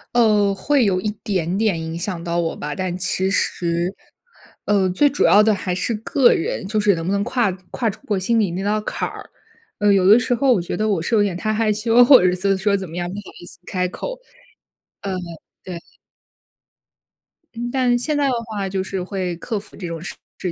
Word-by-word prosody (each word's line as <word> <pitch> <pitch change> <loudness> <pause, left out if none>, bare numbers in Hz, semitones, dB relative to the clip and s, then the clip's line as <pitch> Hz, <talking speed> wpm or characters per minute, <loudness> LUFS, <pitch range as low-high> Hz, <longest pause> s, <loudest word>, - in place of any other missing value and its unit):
呃， 210 -4 +4
会 255 +7 +1
有 185 -2 +1
一 210 - -1
点 185 -2 -1
点 210 -6 +1
影 160 +1 -5
响 175 -1 -4
到 170 0 -2
我 165 -1 -1
吧， 150 0 -5
但 185 -2 -3
其 185 +1 0
实， 175 -2 0 0.7
呃， 200 -2 +2
最 290 +11 +3
主 280 - 0
要 205 - +6
的 215 0 +4
还 185 -1 -3
是 185 +6 -1
个 240 +4 +3
人， 190 +5 -3
就 215 +1 0
是 205 -1 +4
能 165 -2 -4
不 185 - -1
能 200 0 +1
跨 240 -2 +1 0.2
跨 230 - -1
出 195 - -8
过 210 -6 0
心 225 +5 +1
里 200 -5 +1
那 185 +3 -4
道 210 +1 +1
坎 - - -3
儿。 - - -10 0.5
呃， 205 -1 +4
有 190 -2 +4
的 215 +4 +8
时 245 0 0
候 260 +2 +3
我 190 - +1
觉 170 - -4
得 215 - 0
我 200 -6 0
是 195 +8 0
有 210 - +4
点 195 -4 -1
太 215 +5 -2
害 215 0 +1
羞， 230 +3 +4
或 260 +1 +8
者 185 - +4
是 180 - +1
做 195 +2 +1
是 195 - +2
说 200 +1 +1
怎 190 -1 -6
么 165 - -10
样， 175 0 -3
不 185 - -7
好 205 - -5 0.2
意 - - -10
思 - - -14
开 180 -2 -1
口， - - -6 0.8
嗯， 195 - -3 0.5
对。 180 -2 -7 1.8
嗯， 240 +1 -4
但 250 -2 +2
现 300 +4 -1
在 285 -1 +2
的 265 - +1
话 205 -3 -3
就 190 0 -2
是 190 -1 -4
会 185 -2 -3
克 215 +4 -3
服 205 - -15
这 180 - -6
种 165 -1 -6 0.4
事 180 - -2
200 Hz, 245 characters per minute, -21 LUFS, 180-220 Hz, 1.8 s, 的